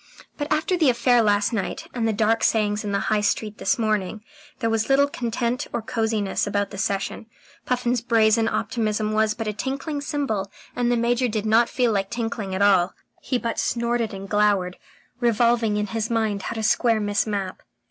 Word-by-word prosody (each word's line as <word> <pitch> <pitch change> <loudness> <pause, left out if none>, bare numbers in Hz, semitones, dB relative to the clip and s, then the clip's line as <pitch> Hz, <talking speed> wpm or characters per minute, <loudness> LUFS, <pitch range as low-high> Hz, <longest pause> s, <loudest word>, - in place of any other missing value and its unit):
But 290 0 -5
after 320 +4 +1
the 320 -6 +3
affair 245 0 +3
last 205 0 +2
night, 200 -4 -3
and 230 -2 0
the - - +2
dark 220 +1 +1
sayings 210 -1 +1
in 205 - -3
the 200 - 0
High 215 -1 +3
Street 210 0 -1
this - - +1
morning, 215 -2 -1 0.3
there 230 -3 -1
was 225 +1 0
little 280 +1 +5
content 240 -2 -2
or - - -1
cosiness 220 -4 -1
about 205 0 -1
the 195 - -7
session. 200 +3 -2 0.4
Puffin's 245 -1 0
brazen 225 -1 +3
optimism 215 -1 -1
was 215 0 +1
but 225 - -4
a 210 - -1
tinkling 275 +6 -3
cymbal, 270 -10 -2 0.2
and 245 -1 +1
the 240 - +2
Major 240 +2 +1
did 215 -2 -2
not 225 +2 +4
feel 245 -3 +1
like 195 -2 -1
tinkling 225 -5 -3
at 195 - +1
all. 190 -3 +4 0.3
He 255 - -1
but 235 -1 -3
snorted 235 -1 0
and 195 -1 -7
glowered, 200 -3 +1 0.4
revolving 235 -2 +2
in 210 - 0
his 220 +2 -3
mind 220 -3 0
how 190 - -5
to 220 - -3
square 225 +1 +3
Miss 205 +1 0
Mapp. 200 -3 -3
220 Hz, 190 wpm, -23 LUFS, 210-240 Hz, 0.4 s, little